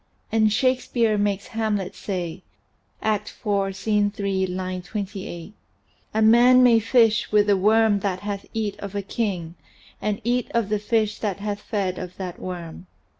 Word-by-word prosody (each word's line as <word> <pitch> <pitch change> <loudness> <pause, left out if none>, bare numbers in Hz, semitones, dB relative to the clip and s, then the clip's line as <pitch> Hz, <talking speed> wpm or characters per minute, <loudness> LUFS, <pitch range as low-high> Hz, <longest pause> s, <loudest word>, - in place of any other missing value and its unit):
And 220 -1 +3
Shakespeare 245 -2 +1
makes 205 -1 -1
Hamlet 210 -4 -1
say 180 -3 -4 0.6
(Act 210 -1 0
IV, 195 -2 0
Scene 210 0 +1
3, 195 -2 -1
line 185 0 -4
28): 195 -2 -6 0.6
"A 220 - +2
man 245 +3 +7
may 235 -2 +6
fish 225 -1 +3
with 210 -1 +4
the 205 -1 +4
worm 215 +1 +3
that 190 -2 -2
hath 205 -1 -5
eat 215 -2 -3
of 200 0 -7
a 200 - -2
king, 190 -6 -3 0.5
and 210 0 -1
eat 245 +2 0
of 230 -3 +1
the 210 0 +1
fish 215 0 0
that 205 -4 -2
hath 205 0 -3
fed 190 -4 -2
of 180 -1 -7
that 185 -2 -6
worm." 175 -1 -7
205 Hz, 160 wpm, -24 LUFS, 190-220 Hz, 0.6 s, man